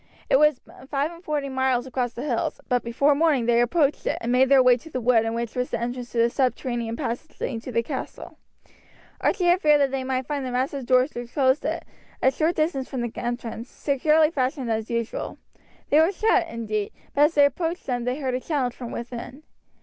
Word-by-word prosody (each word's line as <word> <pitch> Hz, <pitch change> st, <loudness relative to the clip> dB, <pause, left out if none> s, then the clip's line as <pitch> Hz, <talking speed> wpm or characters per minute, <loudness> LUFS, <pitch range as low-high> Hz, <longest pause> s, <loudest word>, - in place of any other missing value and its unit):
It 270 Hz, -, +6 dB
was 300 Hz, -3 st, +4 dB, 0.3 s
five 285 Hz, +2 st, 0 dB
and 340 Hz, +1 st, -13 dB
forty 295 Hz, -3 st, -2 dB
miles 260 Hz, -2 st, 0 dB
across 250 Hz, -2 st, -2 dB
the 245 Hz, -, -6 dB
hills, 250 Hz, -6 st, -1 dB
but 245 Hz, -1 st, +1 dB
before 265 Hz, +5 st, +2 dB
morning 290 Hz, -5 st, +2 dB
they 235 Hz, 0 st, +4 dB
approached 285 Hz, +4 st, +1 dB
it, -, -, 0 dB
and 235 Hz, -, -2 dB
made 255 Hz, +1 st, +4 dB
their 270 Hz, -2 st, +6 dB
way 250 Hz, -1 st, +6 dB
to 320 Hz, +7 st, -13 dB
the 260 Hz, -, -3 dB
wood 230 Hz, -2 st, +3 dB
in 225 Hz, 0 st, -2 dB
which 235 Hz, -1 st, -3 dB
was 250 Hz, 0 st, -1 dB
the -, -, -2 dB
entrance 245 Hz, +1 st, -4 dB
to -, -, -4 dB
the 230 Hz, +1 st, +3 dB
subterranean 240 Hz, -3 st, -1 dB
passage 240 Hz, +8 st, -5 dB
leading 230 Hz, -3 st, -3 dB
to 255 Hz, -, -7 dB
the 230 Hz, 0 st, +1 dB
castle. 265 Hz, +2 st, -7 dB, 0.8 s
Archie 375 Hz, -, +1 dB
had 350 Hz, +2 st, +4 dB
feared 300 Hz, -1 st, +5 dB
that 275 Hz, -2 st, +2 dB
they 270 Hz, -1 st, -2 dB
might 260 Hz, 0 st, -2 dB
find 290 Hz, -1 st, -3 dB
the 255 Hz, -, -3 dB
massive 260 Hz, +1 st, -2 dB
doors 255 Hz, +2 st, +3 dB
which 240 Hz, 0 st, -7 dB
closed 265 Hz, -1 st, +2 dB
it, -, -, -2 dB, 0.3 s
a 265 Hz, -, +3 dB
short 320 Hz, +5 st, 0 dB
distance 310 Hz, -4 st, -1 dB
from 260 Hz, -, -3 dB
the 240 Hz, -1 st, -3 dB
entrance, 240 Hz, 0 st, -4 dB
securely 305 Hz, +3 st, +2 dB
fastened 260 Hz, -4 st, -1 dB
as 220 Hz, 0 st, -2 dB
usual. 230 Hz, -1 st, -3 dB, 0.5 s
They 295 Hz, -, +6 dB
were 325 Hz, +4 st, +4 dB
shut, 395 Hz, -3 st, +2 dB
indeed, 215 Hz, -6 st, -3 dB, 0.2 s
but 290 Hz, +1 st, +5 dB
as 320 Hz, -, -1 dB
they 290 Hz, -1 st, +7 dB
approached 330 Hz, +4 st, -2 dB
them 245 Hz, -2 st, -2 dB
they 250 Hz, +3 st, -1 dB
heard 260 Hz, -3 st, -2 dB
a 250 Hz, -, 0 dB
challenge 260 Hz, -4 st, -1 dB
from 245 Hz, -2 st, -8 dB
within. 245 Hz, +4 st, -7 dB
260 Hz, 220 wpm, -24 LUFS, 240-295 Hz, 0.8 s, they